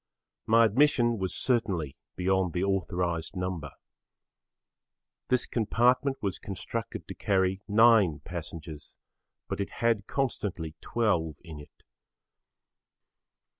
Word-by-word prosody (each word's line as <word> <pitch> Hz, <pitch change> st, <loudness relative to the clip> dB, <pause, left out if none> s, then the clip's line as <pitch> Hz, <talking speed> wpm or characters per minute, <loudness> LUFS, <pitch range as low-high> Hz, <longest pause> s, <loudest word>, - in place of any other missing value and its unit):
My 115 Hz, +1 st, +6 dB
admission 120 Hz, -1 st, +3 dB
was 95 Hz, -1 st, -2 dB
certainly 95 Hz, -, 0 dB, 0.2 s
beyond 95 Hz, -1 st, +1 dB
the 90 Hz, -, 0 dB
authorised 90 Hz, -3 st, -1 dB
number. 90 Hz, -5 st, -3 dB, 1.6 s
This 125 Hz, -1 st, +2 dB
compartment 125 Hz, +4 st, +2 dB
was 100 Hz, -3 st, -2 dB
constructed 100 Hz, +4 st, -5 dB
to -, -, -6 dB
carry 95 Hz, -1 st, +1 dB
9 105 Hz, -7 st, +5 dB
passengers 80 Hz, -3 st, -8 dB, 0.5 s
but -, -, -3 dB
it 100 Hz, -, -3 dB
had 115 Hz, -4 st, 0 dB
constantly 100 Hz, -, -2 dB
12 85 Hz, -10 st, 0 dB
in 80 Hz, -4 st, -9 dB
it. 75 Hz, -, -16 dB
95 Hz, 100 wpm, -28 LUFS, 85-115 Hz, 1.6 s, My